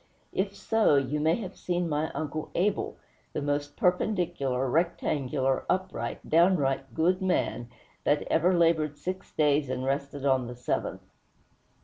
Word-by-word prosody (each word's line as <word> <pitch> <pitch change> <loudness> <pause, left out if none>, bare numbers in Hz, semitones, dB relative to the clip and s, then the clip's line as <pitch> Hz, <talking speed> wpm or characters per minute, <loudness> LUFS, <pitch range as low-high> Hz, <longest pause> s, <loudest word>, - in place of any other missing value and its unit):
If 195 +1 -1
so, 220 -9 +3
you 140 +2 +1
may 160 +2 +3
have 195 -5 -6
seen 175 -1 -1
my 155 0 0
Uncle 155 +1 -3
Abel; 200 +4 0 0.4
the - - -2
most 145 0 -2
perpendicular, 175 -8 +1
rectangular, 135 -3 0
upright, 185 -11 -2
downright 145 -7 +2
good 180 +4 +2
man 180 -9 0 0.3
that 145 0 +2
ever 170 +3 +2
labored 160 -3 +2
six 185 +5 -5
days 145 -2 +2
and 130 0 -2
rested 140 +1 -2
on 130 -3 +2
the 120 - -7
seventh. 125 - -3
150 Hz, 135 wpm, -28 LUFS, 135-175 Hz, 0.4 s, so